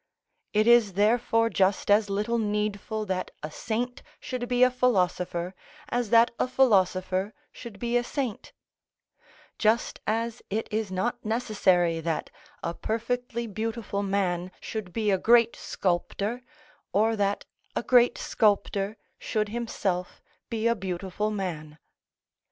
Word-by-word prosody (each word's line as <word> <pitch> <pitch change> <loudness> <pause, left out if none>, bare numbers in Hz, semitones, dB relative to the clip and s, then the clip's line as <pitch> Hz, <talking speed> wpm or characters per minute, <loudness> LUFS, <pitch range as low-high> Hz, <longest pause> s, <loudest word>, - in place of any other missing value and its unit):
It 215 0 +3
is 235 -4 +5
therefore 230 +3 +2
just 195 +1 +2
as 205 0 +4
little 210 +4 0
needful 210 0 -2
that 185 -2 -2
a 155 - -4
saint 240 +7 -3 0.2
should 250 -3 -4
be 245 0 +4
a 255 - +5
philosopher 180 -7 0 0.4
as 245 -4 -1
that 230 +1 +6
a - - +2
philosopher 190 -5 +2 0.2
should 235 -5 -10
be 240 +2 -2
a 245 - +3
saint; 255 -4 -4 1.1
just 220 +2 +2
as 230 +2 -1
it 220 +3 -2
is 215 -3 -1
not 190 +6 -2
necessary 200 -7 +2
that 165 -1 -2 0.3
a 170 - -2
perfectly 235 +3 -2
beautiful 220 -1 -3
man 185 -3 0
should 215 -5 -5
be 215 +1 0
a 190 - +2
great 235 +1 +5
sculptor, 200 +6 -2 0.5
or 220 +2 +3
that 200 -1 0 0.3
a - - -1
great 245 -1 +5
sculptor 205 -1 +1 0.2
should 215 -1 -1
himself 205 -6 -2 0.3
be 225 -1 -2
a 235 - +5
beautiful 190 +1 -3
man. 165 -7 -4
215 Hz, 130 wpm, -27 LUFS, 190-235 Hz, 1.1 s, that